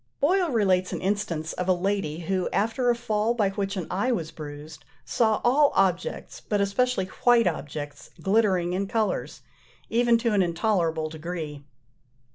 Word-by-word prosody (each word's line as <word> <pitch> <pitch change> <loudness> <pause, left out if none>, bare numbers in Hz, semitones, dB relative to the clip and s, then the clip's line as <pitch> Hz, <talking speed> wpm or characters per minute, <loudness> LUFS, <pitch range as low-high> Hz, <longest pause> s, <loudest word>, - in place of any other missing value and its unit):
Boyle 355 +4 +2
relates 190 -7 +2
an - - -3
instance 185 -5 -2
of 180 - -3
a 185 - +5
lady, 180 -3 -2
who, 185 +2 -1
after 225 +4 0
a 240 - +3
fall 230 -1 0
by 205 -4 +1
which 195 0 -3
an 180 - -3
eye 200 +8 0
was 165 -9 -2
bruised, 150 0 -9 0.2
saw 220 -2 +2
all 280 +4 +4
objects, 185 -2 0
but 205 - +1
especially 200 +1 +1
white 235 +4 +3
objects, 145 -3 -4
glittering 190 -4 +2
in 195 +2 -1
colours, 220 0 -2 0.5
even 235 0 +4
to 230 -1 0
an 200 - +3
intolerable 170 -3 0
degree. 155 -2 -6
195 Hz, 155 wpm, -26 LUFS, 170-225 Hz, 0.5 s, a